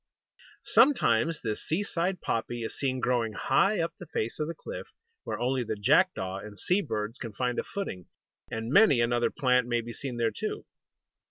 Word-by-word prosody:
Sometimes 165 Hz, -, +3 dB
this 110 Hz, -2 st, -2 dB
seaside 180 Hz, +1 st, -1 dB
poppy 120 Hz, +1 st, -2 dB
is 110 Hz, -, -4 dB
seen 130 Hz, -2 st, -1 dB
growing 120 Hz, -3 st, 0 dB
high 195 Hz, -, +2 dB
up 165 Hz, 0 st, -1 dB
the 175 Hz, -, -9 dB
face 115 Hz, +1 st, -3 dB
of 150 Hz, -, -1 dB
the 165 Hz, -, -4 dB
cliff, 480 Hz, -, -7 dB, 0.4 s
where -, -, -3 dB
only 125 Hz, +1 st, 0 dB
the 110 Hz, -1 st, -3 dB
jackdaw 100 Hz, -, +2 dB
and 105 Hz, 0 st, -10 dB
sea 180 Hz, -, +1 dB
birds 110 Hz, -, -4 dB
can 115 Hz, -4 st, -6 dB
find 125 Hz, +3 st, -1 dB
a -, -, -1 dB
footing; 145 Hz, -, -5 dB, 0.4 s
and 115 Hz, +3 st, -4 dB
many 145 Hz, -, +6 dB
another 120 Hz, 0 st, +2 dB
plant 125 Hz, -2 st, +2 dB
may 120 Hz, -1 st, +1 dB
be 120 Hz, +1 st, -8 dB
seen 130 Hz, -2 st, -5 dB
there 115 Hz, -1 st, +1 dB
too. 105 Hz, -, -4 dB
125 Hz, 180 wpm, -28 LUFS, 115-165 Hz, 0.4 s, many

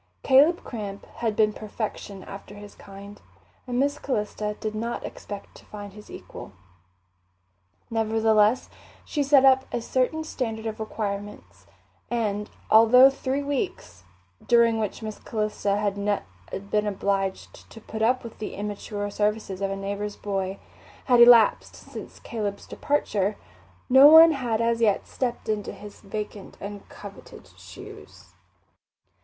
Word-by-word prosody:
Caleb 290 Hz, +6 st, +5 dB
Cramp 205 Hz, -4 st, -7 dB
had 225 Hz, -3 st, -1 dB
been 215 Hz, -1 st, +3 dB
perfection 210 Hz, -2 st, -6 dB
after 200 Hz, +1 st, -10 dB
his 205 Hz, 0 st, -11 dB
kind, 200 Hz, +1 st, -12 dB, 0.5 s
and 245 Hz, 0 st, -1 dB
Miss 285 Hz, +2 st, +1 dB
Calista 210 Hz, -4 st, -3 dB
did 215 Hz, -1 st, -3 dB
not 230 Hz, +2 st, -4 dB
expect 205 Hz, -1 st, -8 dB
to -, -, -17 dB
find 205 Hz, -2 st, -9 dB
his 210 Hz, 0 st, -13 dB
equal. -, -, -10 dB, 1.4 s
Nevertheless, 220 Hz, 0 st, +2 dB, 0.4 s
she 295 Hz, -, -2 dB
set 275 Hz, -1 st, +5 dB
up 265 Hz, 0 st, +5 dB
a -, -, -1 dB
certain 260 Hz, +6 st, -1 dB
standard 225 Hz, -7 st, -4 dB
of 220 Hz, -1 st, -4 dB
requirements; 205 Hz, -2 st, -6 dB, 0.4 s
and 210 Hz, -3 st, -2 dB, 0.2 s
although 250 Hz, +5 st, +8 dB
three 270 Hz, +1 st, -2 dB
weeks, 270 Hz, -, -4 dB, 0.4 s
during 235 Hz, -1 st, +4 dB
which 215 Hz, +1 st, -3 dB
Miss 215 Hz, -1 st, -6 dB
Calista 210 Hz, -2 st, -2 dB
had 205 Hz, 0 st, 0 dB, 0.5 s
been 210 Hz, 0 st, +1 dB
obliged 195 Hz, -1 st, -3 dB
to 225 Hz, -, -12 dB
put 220 Hz, 0 st, -7 dB
up 250 Hz, +3 st, +2 dB
with 230 Hz, -, -10 dB
the 215 Hz, -, -5 dB
immature 205 Hz, 0 st, -4 dB
services 210 Hz, -2 st, -1 dB
of 195 Hz, -, 0 dB
a 195 Hz, -, -3 dB
neighbour's 200 Hz, +1 st, -4 dB
boy, 195 Hz, -1 st, -3 dB, 0.5 s
had 245 Hz, -2 st, +4 dB
elapsed 235 Hz, -2 st, +6 dB
since -, -, -10 dB
Caleb's 205 Hz, -3 st, -4 dB
departure, 210 Hz, -8 st, -1 dB, 0.5 s
no 265 Hz, +2 st, +8 dB
one 320 Hz, +2 st, +9 dB
had 240 Hz, -6 st, -1 dB
as 230 Hz, 0 st, +1 dB
yet 210 Hz, -3 st, +2 dB
stepped 245 Hz, -3 st, -4 dB
into 215 Hz, -2 st, -2 dB
his 205 Hz, -1 st, -12 dB
vacant 210 Hz, -1 st, -7 dB
and 205 Hz, 0 st, -8 dB
coveted 200 Hz, -1 st, -12 dB
shoes. -, -, -13 dB
215 Hz, 135 wpm, -25 LUFS, 205-240 Hz, 1.4 s, one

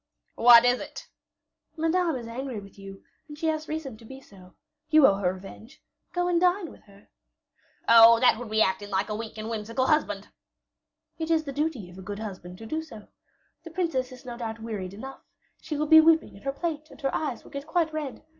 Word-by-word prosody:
"What 235 Hz, 0 st, +7 dB
is 245 Hz, 0 st, +3 dB
it?" -, -, -9 dB, 0.7 s
"Madame 330 Hz, 0 st, +1 dB
is 235 Hz, -2 st, -6 dB
angry 245 Hz, 0 st, -5 dB
with 200 Hz, 0 st, -14 dB
you, 195 Hz, 0 st, -11 dB, 0.2 s
and 295 Hz, -1 st, -10 dB
she 325 Hz, -, -4 dB
has 310 Hz, 0 st, -3 dB
reason 305 Hz, -7 st, -5 dB
to 230 Hz, -, -17 dB
be 265 Hz, +4 st, -11 dB
so. 185 Hz, -7 st, -18 dB, 0.3 s
You 310 Hz, -2 st, +6 dB
owe 195 Hz, -, +5 dB
her 185 Hz, -3 st, 0 dB
revenge; 195 Hz, +5 st, -13 dB, 0.3 s
go 355 Hz, 0 st, -1 dB
and 350 Hz, -1 st, +1 dB
dine 360 Hz, -1 st, +1 dB
with -, -, -16 dB
her." 200 Hz, 0 st, -20 dB, 0.8 s
"Oh! 230 Hz, 0 st, +8 dB
that 240 Hz, -2 st, +4 dB
would 245 Hz, -3 st, -7 dB
be 220 Hz, 0 st, +3 dB
acting 190 Hz, +2 st, -2 dB
like 195 Hz, +2 st, -1 dB
a 210 Hz, -, -2 dB
weak 220 Hz, 0 st, -7 dB
and 215 Hz, 0 st, -5 dB
whimsical 230 Hz, +3 st, -2 dB
husband." 210 Hz, -10 st, 0 dB, 0.9 s
"It 320 Hz, 0 st, -3 dB
is 320 Hz, -1 st, +2 dB
the 280 Hz, -2 st, -6 dB
duty 290 Hz, -, -2 dB
of 180 Hz, -, -12 dB
a -, -, -8 dB
good 205 Hz, +2 st, -6 dB
husband 185 Hz, -4 st, -8 dB
to 225 Hz, -, -10 dB
do 310 Hz, +8 st, -3 dB
so. 225 Hz, -10 st, -13 dB, 0.5 s
The 330 Hz, -, -9 dB
princess 320 Hz, -7 st, -2 dB
is 255 Hz, +1 st, -13 dB
no 240 Hz, -1 st, -7 dB
doubt 225 Hz, -2 st, -5 dB
wearied 205 Hz, -4 st, -6 dB
enough; 265 Hz, +6 st, -9 dB, 0.4 s
she 310 Hz, -2 st, -4 dB
will 305 Hz, -, 0 dB
be 315 Hz, +1 st, +8 dB
weeping 325 Hz, 0 st, +3 dB
in 200 Hz, -, -14 dB
her 275 Hz, -, -2 dB
plate, 310 Hz, 0 st, -4 dB
and -, -, -15 dB
here 275 Hz, -3 st, -1 dB
eyes 285 Hz, -7 st, -3 dB
will -, -, -16 dB
get 280 Hz, 0 st, -7 dB
quite 320 Hz, -1 st, 0 dB
red. 300 Hz, -2 st, -5 dB
250 Hz, 220 wpm, -26 LUFS, 215-310 Hz, 0.9 s, Oh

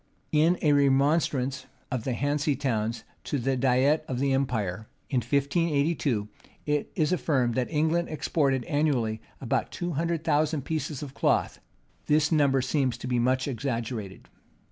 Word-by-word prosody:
In 160 Hz, +4 st, +3 dB
a 150 Hz, -2 st, +4 dB
remonstrance 140 Hz, -1 st, +2 dB, 0.2 s
of 125 Hz, -3 st, -2 dB
the 130 Hz, -, 0 dB
Hanse 145 Hz, +2 st, 0 dB
Towns 115 Hz, -4 st, -1 dB, 0.2 s
to 145 Hz, -, -1 dB
the 135 Hz, +1 st, 0 dB
diet 130 Hz, +4 st, +2 dB
of 130 Hz, -, -3 dB
the 135 Hz, +1 st, +1 dB
empire, 110 Hz, -7 st, -1 dB, 0.2 s
in 135 Hz, -, +1 dB
1582, 140 Hz, -, +1 dB, 0.4 s
it 150 Hz, -1 st, -1 dB
is 155 Hz, -2 st, +1 dB
affirmed 130 Hz, -9 st, +1 dB
that 125 Hz, +1 st, -1 dB
England 160 Hz, +2 st, +1 dB
exported 140 Hz, -4 st, 0 dB
annually 125 Hz, -7 st, 0 dB, 0.2 s
about 125 Hz, -, -1 dB
two 175 Hz, 0 st, -3 dB
hundred 165 Hz, +1 st, -1 dB
thousand 155 Hz, -2 st, +1 dB
pieces 150 Hz, -3 st, -3 dB
of 140 Hz, -2 st, -8 dB
cloth.[] -, -, +1 dB, 0.5 s
This 150 Hz, +1 st, +3 dB
number 140 Hz, -4 st, +3 dB
seems 130 Hz, -3 st, 0 dB
to 120 Hz, -, -8 dB
be 125 Hz, -1 st, 0 dB
much 130 Hz, +2 st, +1 dB
exaggerated. 115 Hz, -5 st, -4 dB
140 Hz, 145 wpm, -27 LUFS, 125-150 Hz, 0.5 s, a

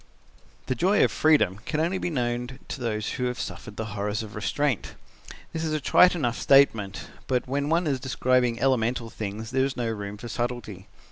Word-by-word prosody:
"The -, -, 0 dB
joy 190 Hz, +9 st, +3 dB
of -, -, +3 dB
freedom 145 Hz, -, +3 dB
can 155 Hz, +4 st, -2 dB
only 175 Hz, +4 st, 0 dB
be -, -, -2 dB
known 125 Hz, -2 st, -2 dB
to -, -, -5 dB
those 110 Hz, -3 st, -2 dB
who 125 Hz, -, -2 dB
have 125 Hz, 0 st, -2 dB
suffered 105 Hz, -2 st, -6 dB
the 110 Hz, -, -3 dB
horrors 105 Hz, +1 st, -2 dB
of 105 Hz, -1 st, -9 dB
restraint. 120 Hz, +5 st, -1 dB, 0.6 s
That 160 Hz, -, -3 dB
is 155 Hz, -1 st, -1 dB
a 155 Hz, -, 0 dB
trite 180 Hz, +6 st, +5 dB
enough 120 Hz, -8 st, -1 dB
statement, 115 Hz, -8 st, +3 dB, 0.2 s
but 125 Hz, -1 st, 0 dB
when 140 Hz, +2 st, -1 dB
one 170 Hz, +2 st, +2 dB
is 140 Hz, -4 st, 0 dB
describing 125 Hz, -2 st, +1 dB
elemental 120 Hz, -3 st, +1 dB
things 110 Hz, +2 st, -5 dB
there 130 Hz, 0 st, +2 dB
is 135 Hz, -1 st, -2 dB
no 120 Hz, -2 st, -1 dB
room 105 Hz, -1 st, -5 dB
for 120 Hz, +3 st, -8 dB
subtlety. 120 Hz, -5 st, -4 dB
125 Hz, 195 wpm, -26 LUFS, 110-140 Hz, 0.6 s, trite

